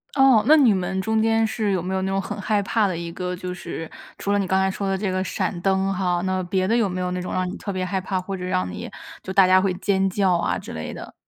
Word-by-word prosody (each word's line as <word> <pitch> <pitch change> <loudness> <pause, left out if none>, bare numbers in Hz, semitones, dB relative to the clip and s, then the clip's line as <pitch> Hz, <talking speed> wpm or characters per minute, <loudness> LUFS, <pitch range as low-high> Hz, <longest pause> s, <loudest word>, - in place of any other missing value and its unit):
哦， 270 -5 +6
那 310 +2 +7
你 245 -8 +5
们 190 0 -2
中 220 +1 +1
间 225 0 +2
是 215 -2 -1
有 185 -3 0
没 185 +2 -3
有 190 - 0
那 190 - -1
种 195 0 0
很 205 +2 -6
害 210 0 +1
怕 215 +1 +1
的 185 -3 -1
一 170 0 -5
个 180 0 -3
就 180 0 -5
是 165 -2 -6 0.3
除 200 - -1
了 205 - +3
你 195 - 0
刚 190 +1 +2
才 190 - +2
说 195 0 -3
的 195 - 0
这 195 0 -2
个 185 0 -1
闪 190 -3 -2
灯 195 +1 +1
哈， 180 -2 0
那 185 0 0
别 185 +1 0
的 230 - +2
有 230 -4 +2
没 185 0 -4
有 180 0 -2
那 180 0 -2
种 180 - -5
让 185 0 -1
你 190 - -6
特 200 - -5
别 185 -1 -2
害 190 0 -2
怕， 185 0 -2
或 190 +1 -5
者 180 - -6
让 95 - -1
你 90 - -7 0.3
就 190 - -5
大 190 -1 +5
家 185 0 +5
会 190 -1 +1
尖 195 0 +1
叫 190 -1 +2
啊 170 -1 0
之 - - -9
类 80 -1 -5
的？ - - -9
190 Hz, 320 characters per minute, -23 LUFS, 180-200 Hz, 0.3 s, 那